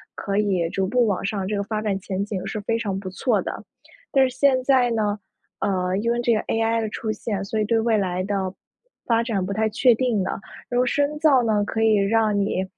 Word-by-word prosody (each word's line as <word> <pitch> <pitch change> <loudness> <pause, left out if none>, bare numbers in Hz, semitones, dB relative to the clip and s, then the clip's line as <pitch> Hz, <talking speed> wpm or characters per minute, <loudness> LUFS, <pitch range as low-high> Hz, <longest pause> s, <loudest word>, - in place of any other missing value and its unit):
可 200 -1 -3
以 195 -5 +1
逐 190 +2 -1
步 240 +4 +2
往 195 -4 -1
上， 195 -1 -2
这 210 - -1
个 200 - -1
发 215 +1 -3
展 205 -3 -1
前 195 +1 -3
景 200 -3 -4
是 215 - -4
非 225 +2 -1
常 200 -5 -2
不 190 -1 -6
错 205 +2 0
的。 - - -6 0.5
但 265 -1 +4
是 250 - -12
现 265 -1 +4
在 255 -3 +4
呢， 210 -2 0 0.4
呃， 185 -1 0
因 230 +3 0
为 240 - 0
这 240 -1 +2
个 215 - +1
AI 225 0 0
的 220 - -2
出 220 +1 -5
现， 205 -2 -3
所 220 - -3
以 - - +2
对 225 +2 +1
未 225 -1 +2
来 185 -2 -1
的， 190 -1 -2 0.5
发 230 -1 +2
展 210 -6 -1
不 200 - -3
太 220 +2 +1
确 240 +2 +4
定 235 -4 0
的。 190 - -4 0.3
然 245 - -2
后 250 - +3
深 285 +3 0
造 295 -5 +5
呢， 215 -3 +2
可 225 - -2
以 220 -1 +4
让 210 +1 +2
你， 195 -2 0
215 Hz, 260 characters per minute, -23 LUFS, 195-235 Hz, 0.5 s, 造